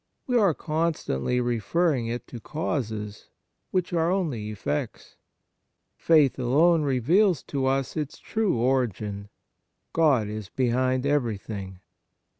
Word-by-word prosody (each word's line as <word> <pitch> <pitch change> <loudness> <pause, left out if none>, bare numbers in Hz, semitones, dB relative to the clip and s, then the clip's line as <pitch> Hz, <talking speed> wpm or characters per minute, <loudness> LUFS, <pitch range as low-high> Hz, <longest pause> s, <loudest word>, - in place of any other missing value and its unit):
We 250 - -1
are 200 -9 +4
constantly 155 - -1
re 120 -1 0
ferring 150 -2 +1
it 120 - -4
to 120 - -7
causes 110 -8 -4 0.4
which 180 -1 -1
are 165 0 +2
only 150 - -1
effects. 85 -8 -4 0.8
Faith 150 -5 +3
alone 155 +7 +4
reveals 150 - +2
to 135 -2 -2
us 135 0 0
its 150 -3 -4
true 220 - -1
origin. 110 -5 -1 0.6
God 140 -10 +3
is 105 -1 -6
behind 130 +1 0
everything. 105 -8 -2
130 Hz, 115 wpm, -26 LUFS, 110-160 Hz, 0.8 s, are